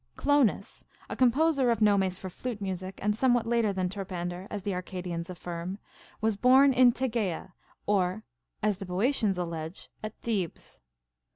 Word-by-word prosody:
Clonas, 285 -6 +1 0.3
a - - -2
composer 270 +1 +3
of 230 -2 +2
nomes 195 -4 +3
for 190 - -7
flute 225 +4 -5
music, 190 -1 -4
and 210 0 +2
somewhat 245 -1 +2
later 230 -2 +2
than 185 -1 -1
Terpan 185 -2 -4
der, 180 +2 -7
as 205 -2 -5
the 200 - -1
Arcadians 180 -2 -5
affirm, 175 +1 -5 0.5
Avas 220 -2 0
born 265 +2 +6
in 250 -1 +6
Tegea 220 -8 -2 0.3
or, 195 +1 +1 0.4
as 210 -2 +2
the 195 - -5
Boeotians 200 +1 +1
allege, 165 -1 -5
at 215 0 -6
Thebes. 200 -8 -3
200 Hz, 155 wpm, -29 LUFS, 180-235 Hz, 0.5 s, born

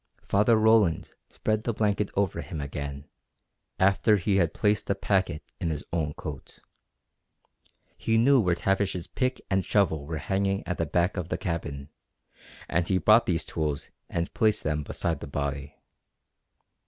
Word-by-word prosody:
Father 105 +3 +4
Roland 110 -6 +3 0.2
spread 110 0 -1
the 115 -2 -2
blanket 105 -1 +1
over 95 -4 0
him 85 -3 -6
again 70 0 -5 0.7
after 100 +3 +4
he 100 +1 +1
had 85 -4 +2
placed 105 -1 +1
the 100 - +1
packet 95 -5 0 0.2
in 85 - -1
his 75 -2 -3
own 75 -3 -1
coat. 75 -3 -8 1.4
He 115 0 +1
knew 130 +4 +5
where 90 -6 +2
Tavish's 95 -1 0
pick 130 0 -2
and 95 0 +2
shovel 80 -8 +1
were 80 0 -3
hanging 95 +4 -1
at 90 - -3
the 85 - 0
back 90 +5 +1
of 90 -2 -3
the - - -1
cabin 75 -5 -4 0.8
and 85 0 0
he 95 - +2
brought 110 +5 +5
these 85 -3 0
tools 75 -3 -3 0.2
and 85 0 -2
placed 110 -1 +2
them 75 -1 0
beside 80 +3 -2
the - - -7
body. 70 0 -4
90 Hz, 155 wpm, -27 LUFS, 80-105 Hz, 1.4 s, knew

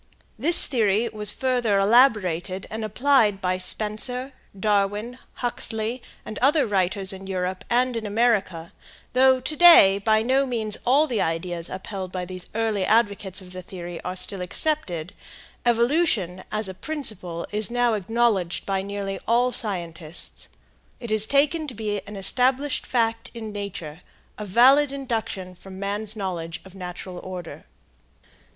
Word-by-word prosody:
This 340 +3 +8
theory 220 -3 +1
was 210 -2 +1
further 245 -6 0
elaborated 195 -5 +3
and 220 +1 -4
applied 215 -2 +2
by 185 -1 -1
Spencer, 245 +7 -1 0.3
Darwin, 210 +4 0
Huxley, 235 0 -3 0.2
and 215 - -6
other 285 +2 +3
writers 195 -1 0
in 190 0 -9
Europe 185 -1 -3
and 250 +1 +1
America, 210 -6 0
and - - -24
though 260 +1 +5
to 280 +4 -4
day 300 - +8
by 215 +1 +2
no 265 +3 +2
means 220 -4 -1
all 280 +5 +5
the 240 -9 -1
ideas 165 +1 -3
upheld 190 -1 -6
by 185 -1 -4
these 185 0 -5
early 220 -3 0
advocates 200 -3 +1
of 180 -1 -13
the 185 - -6
theory 175 -2 -8
are 180 - -5
still 185 +1 -1
accepted, 180 - 0 0.5
evolution 235 - +1
as 215 -1 -1
a 190 - -6
principle 185 - -4
is 210 +1 +1
now 245 -1 +1
acknowledged 210 -3 0
by 195 -1 -1
nearly 200 0 -5
all 245 +2 +3
scientists. 175 -7 -5 0.5
It 235 -3 -7
is 215 0 +2
taken 300 +4 +2
to 255 - -7
be 210 -2 -3
an 205 - -8
established 255 +7 +1
fact 230 -2 0
in 220 -2 -6
nature, 180 -6 -7 0.4
a 210 - -5
valid 265 +8 +5
induction 225 -9 -4
from 190 +1 -12
man's 205 +2 -3
knowledge 175 -5 -4
of 190 - -14
natural 180 -1 -8
order. 180 -2 -8
210 Hz, 145 wpm, -24 LUFS, 185-240 Hz, 0.5 s, This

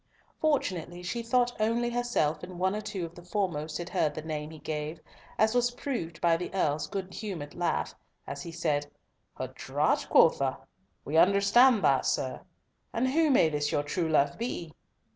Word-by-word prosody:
Fortunately 180 - -1
she 235 +7 -3
thought 245 +1 +1
only 235 +2 +1
herself 240 -11 0
and 180 0 -8
one 190 +2 +1
or 210 - -3
two 210 -4 -4
of 165 - -10
the 175 - -12
foremost 175 -5 -2
had 175 0 -6
heard 155 -5 0
the 155 - -5
name 155 -1 -4
he 160 - -10
gave, 155 +1 -4 0.4
as 220 +1 +3
was 245 0 +3
proved 245 - -4
by 170 -1 +4
the 175 +1 -4
Earl's 150 -5 +1
good 190 +1 -5
humoured 170 -9 -5
laugh, 175 -1 -1 0.3
as 140 0 -6
he 170 - -7
said, 150 -3 -1 0.5
"A - - -4
draught, - - 0
quotha? - - +4 0.5
We 155 +3 0
understand 200 +5 +5
that, 140 - +6
young - - -4
sir. 130 -1 -1 0.5
And 250 +3 0
who 315 +3 +3
may 250 - +5
this 145 -1 -1
your 145 - +1
true 160 +3 -1
love 150 +2 +2
be?" 175 -9 -4
175 Hz, 180 wpm, -29 LUFS, 155-225 Hz, 0.5 s, that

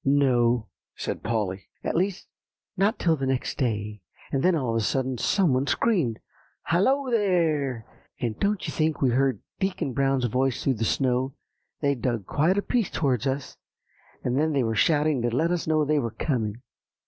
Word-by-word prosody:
"No," 125 -5 +3 0.3
said - - -4
Polly; 105 -4 -2 0.2
"at - - -2
least 185 +2 -1 0.5
not 200 +4 +2
till 165 -2 +2
the 135 -3 -3
next 130 -1 -2
day. 105 -4 -2 0.3
And 135 - 0
then 180 +2 +3
all 130 -7 -1
of 115 - 0
a 115 - 0
sudden 130 +1 -1
some 185 - +2
one 130 +2 +1
screamed, 170 - +1 0.5
'Hallo, 260 +10 +2
there!' 160 - +1 0.3
and 115 -3 -3
don't 205 -1 0
you - - -4
think 155 -2 0
we 130 - +4
heard 135 +1 +1 0.2
Deacon 185 -8 -1
Brown's 135 -1 +1
voice 125 +2 0
through 135 - +2
the 115 - +1
snow; 130 +2 0 0.5
they'd 140 -4 0
dug 120 -6 -1
quite 165 - +2
a 200 - +1
piece 235 -6 0
towards 135 -4 0
us, 135 0 -3 0.7
and 125 - 0 0.2
they 135 - +2
were 115 -1 0
shouting 150 +4 +2
to 120 - +1
let 165 +5 +2
us 175 -2 -1
know 155 -1 +2
they 150 0 +2
were 120 -4 -1
coming." 115 -1 -2
135 Hz, 180 wpm, -26 LUFS, 120-165 Hz, 0.7 s, we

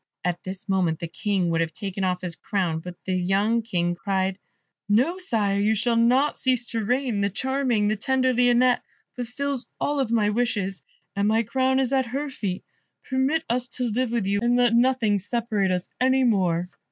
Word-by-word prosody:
At 175 -1 -1
this 185 0 -7
moment 185 -5 +1
the 170 - -5
King 185 0 -1
would 165 0 +1
have 165 -1 -2
taken 195 +2 -4
off 180 -1 0
his 180 -2 -3
crown, 180 -6 -1
but 180 +2 -8
the 185 - -1
young 195 +6 +1
King 175 -6 -1
cried, 190 +1 -1 0.5
"No, 260 - +2
sire, 210 - 0
you 215 +2 +2
shall 230 +3 +1
not 250 +5 +3
cease 255 -2 +1
to 225 -1 -1
reign: 245 -1 0
the 200 - +1
charming, 255 -1 0
the 215 - +1
tender 260 +3 +1
Lionette 245 0 +3 0.3
fulfils 250 +1 -3
all 285 -1 +1
my 220 -2 +2
wishes, 205 -6 -1 0.3
and 200 +1 +1
my 220 +2 +3
crown 260 +3 +1
is 265 0 0
at 265 -2 +2
her 275 +4 -3
feet. 190 -7 -4 0.5
Permit 265 +5 +1
us 250 +1 0
to 245 0 -3
live 250 +3 0
with 235 -4 0
you, 200 +1 +1
and 240 +1 +2
let 245 -1 +3
nothing 235 -4 +3
separate 215 -1 -1
us 180 -1 -1
any 260 +1 +3
more." 180 -7 +2
225 Hz, 190 wpm, -24 LUFS, 195-250 Hz, 0.5 s, not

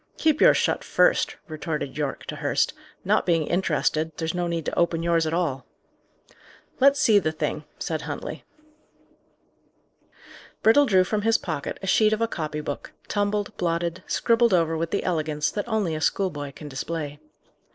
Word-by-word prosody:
"Keep 310 -2 +2
yours - - +7
shut - - 0
first," - - +2
retorted 155 -3 -4
Yorke 145 -2 -3
to - - -6
Hurst. - - +1 0.3
"Not - - +3
being 165 -3 +1
interested, 160 -2 0
there's 160 0 -2
no 175 -1 -1
need 170 -2 -2
to - - -2
open 170 -1 +1
yours 165 -1 +2
at 155 - -2
all." 145 -7 -1 1.2
"Let's 280 +1 +5
see 210 -3 +5
the 155 -5 -1
thing," 155 - -3
said - - -3
Huntley. - - -6 2.2
Brittle 280 +6 +6
drew 185 -4 +5
from 210 +3 -1
his 225 +1 +3
pocket 155 -6 -4
a - - -2
sheet 215 +3 +4
of 215 - -1
a 230 - +2
copy 155 -7 -4
book, 145 -1 -6 0.2
tumbled, 205 0 -1
blotted, 170 +1 -1
scribbled 230 -3 +3
over 165 -2 +1
with 165 +1 -2
the 200 - -1
elegance 155 -4 -1
that 205 +2 -4
only 215 -7 0
a 155 - -3
schoolboy 145 -7 -1
can 150 - -10
display. 145 +1 -5
170 Hz, 165 wpm, -25 LUFS, 155-205 Hz, 2.2 s, yours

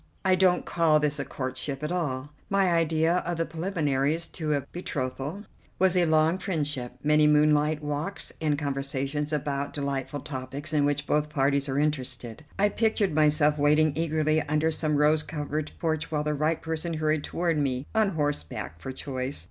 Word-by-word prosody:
I 190 - +5
don't 185 -1 +3
call 160 -3 +3
this 150 -1 0
a 140 - -2
courtship 135 +2 -4
at 150 - -2
all. 145 -6 -2 0.2
My 195 -2 +3
idea 165 0 +2
of 175 -1 -2
the 165 - 0
preliminaries 160 -3 -1
to 155 -3 -2
a 140 - 0
betrothal 145 +2 -4 0.3
was 190 0 +3
a 175 -2 +3
long 160 +3 +3
friendship, 150 -9 -2
many 150 0 +4
moonlight 150 0 +3
walks, 150 +7 -3
and 150 -2 +1
conversations 140 +1 -2
about 145 -1 -2
delightful 140 0 -3
topics 140 +2 -6
in 145 -2 +3
which 145 0 0
both 150 +1 +1
parties 140 -1 +1
are 135 - -1
interested. 130 -3 -2
I 205 +1 +3
pictured 215 -4 +1
myself 150 -1 +4
waiting 150 +1 +4
eagerly 155 -1 +1
under 150 +2 +1
some 155 -1 0
rose 150 +1 +4
covered 150 0 -4
porch 160 -1 -1
while 150 -2 -1
the 150 0 0
right 155 +2 0
person 160 +1 -3
hurried 155 -1 0
toward 170 -2 0
me, 130 -2 -1
on 220 -2 +3
horseback 145 - -3
for 130 - -6
choice. 130 - -4
150 Hz, 170 wpm, -27 LUFS, 145-160 Hz, 0.3 s, I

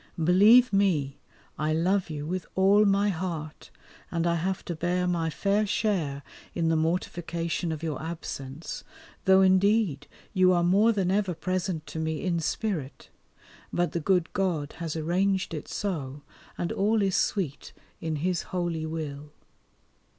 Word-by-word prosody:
Believe 205 +9 +6
me, 165 -9 +1 0.4
I 155 +1 +1
love 180 +3 +1
you 150 -2 -5
with 180 +2 -3
all 200 +3 +5
my 200 +1 +3
heart, 165 -4 -5 0.4
and 170 -1 -1
I 170 - +2
have 180 +3 -2
to 175 - -3
bear 175 +2 0
my 170 -2 0
fair 200 +5 +1
share 170 -10 -1 0.3
in 165 -2 +1
the 165 - +2
mortification 170 +1 -1
of 160 0 -5
your 160 -3 -3
absence, 160 -3 -6 0.4
though 190 0 +6
indeed 190 -5 +3 0.3
you 185 -2 +5
are 175 -1 +2
more 200 +6 +4
than 195 -4 0
ever 195 -3 0
present 180 -1 -2
to 160 - -6
me 160 -1 -2
in 175 -3 0
spirit; 165 -4 -3 0.6
but 175 -3 0
the 170 - -1
good 180 0 +1
God 170 -7 -1
has 165 -2 -3
arranged 185 +4 0
it 150 - -5
so, 145 -8 -4 0.3
and 175 - -2
all 210 +2 +2
is 195 -1 +1
sweet 180 -8 -1 0.3
in 160 -1 -3
His 180 -2 +1
holy 170 -3 -2
will. 150 -2 -5
175 Hz, 150 wpm, -27 LUFS, 160-190 Hz, 0.6 s, Believe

